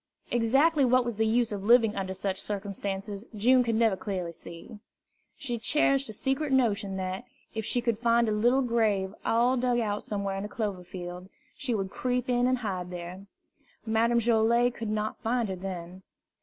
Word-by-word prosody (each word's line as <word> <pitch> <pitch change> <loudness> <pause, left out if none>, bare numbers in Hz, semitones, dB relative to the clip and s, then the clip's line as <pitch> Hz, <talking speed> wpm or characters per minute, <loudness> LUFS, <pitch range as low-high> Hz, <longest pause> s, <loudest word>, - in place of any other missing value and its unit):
Exactly 270 +6 +3
what 255 0 +4
was 235 -3 -3
the 220 0 +2
use 230 +1 +2
of 200 -2 -4
living 225 -1 +5
under 190 -1 -3
such 190 0 -3
circumstances 200 0 -4
June 250 +5 +4 0.2
never 225 -3 +3
could - - -14
clearly 185 -4 -3
see. 170 +5 -10 0.6
She 240 -5 -3
cherished 275 +1 +2
a - - -6
secret 270 +6 -1
notion 215 -7 +1
that, 185 +3 -3 0.3
if 220 -1 -3
she 245 - +1
could 235 -3 0
find 235 0 +3
a - - +1
little 240 +6 +3
grave 215 -5 +1
all 245 +3 +2
dug 245 0 +1
out 210 -3 -1
somewhere 200 -2 -3
in 195 - -3
a - - -6
clover 205 -6 -3
field, 180 0 -8 0.3
she 255 -5 -1
would 195 -2 -2
creep 250 +1 -1
in 245 0 +3
and 255 0 +2
hide 190 -6 -4
there. 180 +2 -8 0.6
Madame 230 +1 +2
Joilet 235 +1 +3
could 230 -2 -5
not 215 0 -2
find 235 -1 0
her 190 - -2
then. 180 -1 -7
220 Hz, 185 wpm, -28 LUFS, 195-240 Hz, 0.6 s, living